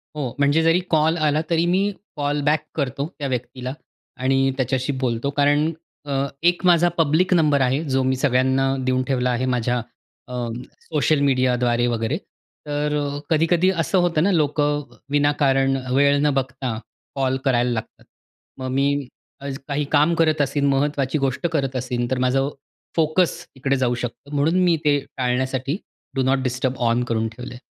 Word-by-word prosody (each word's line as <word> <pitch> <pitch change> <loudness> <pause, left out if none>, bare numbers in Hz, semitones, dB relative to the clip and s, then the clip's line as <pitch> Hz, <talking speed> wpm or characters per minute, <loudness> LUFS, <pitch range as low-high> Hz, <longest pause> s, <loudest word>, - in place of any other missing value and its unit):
हो. 135 -5 -3
म्हणजे 145 +3 +3
जरी 165 +2 +4
कॉल 160 +1 +3
आला 155 0 +2
तरी 170 0 +2
मी 195 +4 +2 0.2
कॉल 145 0 -1
बॅक 150 0 +2
करतो 140 -1 -2
त्या 140 - -2
व्यक्तीला 125 +1 -4 0.5
आणि 135 0 +2
त्याच्याशी 130 +2 0
बोलतो. 120 +2 0
कारण 145 +2 +3 0.3
अ, 140 - -3 0.3
एक 175 +1 +2
माझा 175 -1 +5
पब्लिक 165 +4 +3
नंबर 150 -5 +3
आहे 135 +5 +1
जो 135 0 +2
मी 130 0 +1
सगळ्यांना 130 0 +2 0.2
देऊन 130 0 +1
ठेवला 125 -2 +1
आहे 125 +2 -1
माझ्या 125 0 0 0.5
अ, 125 -1 -3 0.3
सोशल 155 -1 +1
मीडियाद्वारे 125 -3 +2
वगैरे. 115 -1 -1 0.5
तर 150 0 -1
अ, 145 0 -2
कधी-कधी 165 +3 +3
असं 190 - 0
होतं 170 -3 +2
ना, 200 - +3
लोकं 150 -2 +1 0.3
विनाकारण 140 -2 +2 0.2
वेळ 140 +1 +4
न 150 - +3
बघता 130 -3 -2 0.4
कॉल 130 -1 0
करायला 125 -2 +2
लागतात. 110 -2 -6 0.5
मग 130 0 -5
मी 140 0 +1 0.6
काही 145 +1 -1
काम 150 +3 +4
करत 155 -2 +2
असेन, 140 0 0
महत्वाची 140 +1 0
गोष्ट 135 +4 0
करत 135 -4 -1
असेन 125 -1 -2
तर 130 - +1
माझं 135 +2 +1
अ, - - -2 0.5
फोकस 165 +2 +1
तिकडे 135 +1 0
जाऊ 125 -2 +1
शकतो. 140 +4 -10
म्हणून 155 +5 +2
मी 170 -2 +3
ते 145 -1 +4 0.2
टाळण्यासाठी 130 +4 -1 0.4
डू 135 - +1
नॉट 135 +1 +2
डिस्टर्ब 130 +1 -1
ऑन 120 +1 +1
करून 115 -2 -1
ठेवलं 125 +3 -9
आहे. 125 +2 -12
140 Hz, 160 wpm, -22 LUFS, 130-150 Hz, 0.6 s, माझा